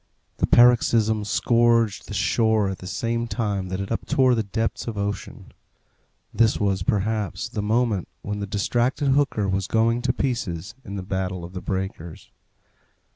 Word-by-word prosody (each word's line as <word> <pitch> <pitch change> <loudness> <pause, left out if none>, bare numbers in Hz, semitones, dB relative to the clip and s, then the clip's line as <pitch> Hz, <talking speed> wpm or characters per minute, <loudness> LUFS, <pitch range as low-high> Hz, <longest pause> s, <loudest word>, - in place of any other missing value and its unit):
The - - +1
paroxysm 115 -3 +4
scourged 115 0 +2
the 105 - -6
shore 110 0 +2
at 95 - -5
the 90 - -8
same 115 +4 -2
time 100 -5 -2
that 95 +1 -3
it 100 - -4
uptore 130 -2 +2
the 115 - +1
depths 110 +3 -3
of 110 -3 -4
ocean. 100 0 -5 0.8
This 115 -1 +3
was, 100 -2 0
perhaps, 105 +1 -1
the 115 -2 -4
moment 110 -2 0 0.2
when 105 0 -4
the 100 - -4
distracted 120 +7 0
hooker 135 -7 +2
was 95 0 -1
going 115 +1 +2
to 125 0 +1
pieces 100 -9 -3
in 100 - -7
the 95 - -4
battle 95 -2 -3
of 90 - -11
the 90 - -5
breakers. 95 -4 -5
105 Hz, 160 wpm, -24 LUFS, 95-115 Hz, 0.8 s, paroxysm